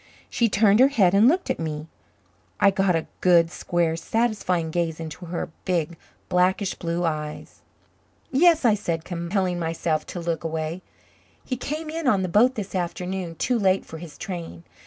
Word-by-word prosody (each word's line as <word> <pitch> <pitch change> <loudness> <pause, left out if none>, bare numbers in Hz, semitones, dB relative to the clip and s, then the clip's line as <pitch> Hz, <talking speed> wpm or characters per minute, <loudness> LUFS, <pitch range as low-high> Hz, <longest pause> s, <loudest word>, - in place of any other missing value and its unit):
She 235 -1 +2
turned 205 +1 +4
her 260 - +8
head 200 -10 +3
and 205 +4 +6
looked 360 +7 +2
at - - -3
me. 155 -1 -4 0.7
I 200 - +5
got 190 -2 +2
a 165 - -1
good, 170 -2 +4
square, 170 -3 0
satisfying 185 -4 -1
gaze 165 -1 -1
into 160 +2 -7
her 170 0 -4
big, 170 -2 -1 0.3
blackish 185 +2 +2
blue 170 +1 -3
eyes. 150 -2 -4 0.7
"Yes," 325 +1 +4
I 225 - +6
said, 170 -6 -2
compelling 175 +1 -1
myself 160 -2 -1
to 175 - -6
look 170 -1 -2
away. 160 +2 -3 0.6
"He 255 - -2
came 305 +5 -4
in 325 -2 -3
on 200 -6 +3
the 185 - -2
boat 240 +8 +4
this 205 -3 -5
afternoon 180 -1 -3
too 245 +8 0
late 190 -2 +2
for 160 - -9
his 165 -3 -10
train. 170 - -6
180 Hz, 170 wpm, -24 LUFS, 165-210 Hz, 0.7 s, her